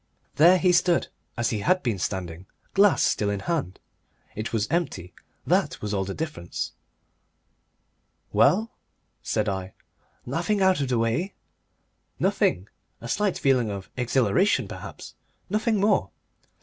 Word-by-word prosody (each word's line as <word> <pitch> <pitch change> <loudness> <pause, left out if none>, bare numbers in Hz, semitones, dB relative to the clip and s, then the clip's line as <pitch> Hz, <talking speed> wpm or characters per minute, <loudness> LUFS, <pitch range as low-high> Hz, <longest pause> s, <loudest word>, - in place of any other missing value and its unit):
There 175 +5 +7
he 180 0 +3
stood 175 0 +2 0.3
as 120 -1 0
he 110 - -1
had 185 - +2
been 115 -6 -1
standing, 90 0 -4 0.3
glass 200 0 +4
still 105 - +1
in 100 -1 -2
hand. 150 - -2 0.5
It 110 +2 -4
was 110 -2 0
empty, 160 - -2 0.3
that - - +1
was 105 -1 -4
all 95 -1 0
the 95 - -5
difference. 150 - -4 1.6
"Well?" 190 - +3 0.5
said 105 0 -1
I. 95 -1 -3 0.5
"Nothing 175 - -1
out 190 -5 +3
of 140 - 0
the 125 - +1
way?" 115 - -1 0.8
"Nothing. 95 +3 +1 0.3
A 120 - -8
slight 205 - 0
feeling 130 -5 +2
of 100 -2 -6
exhilaration, 125 - +2
perhaps. - - -9 0.4
Nothing 215 +2 +1
more." 205 +1 +2
125 Hz, 135 wpm, -25 LUFS, -, 1.6 s, There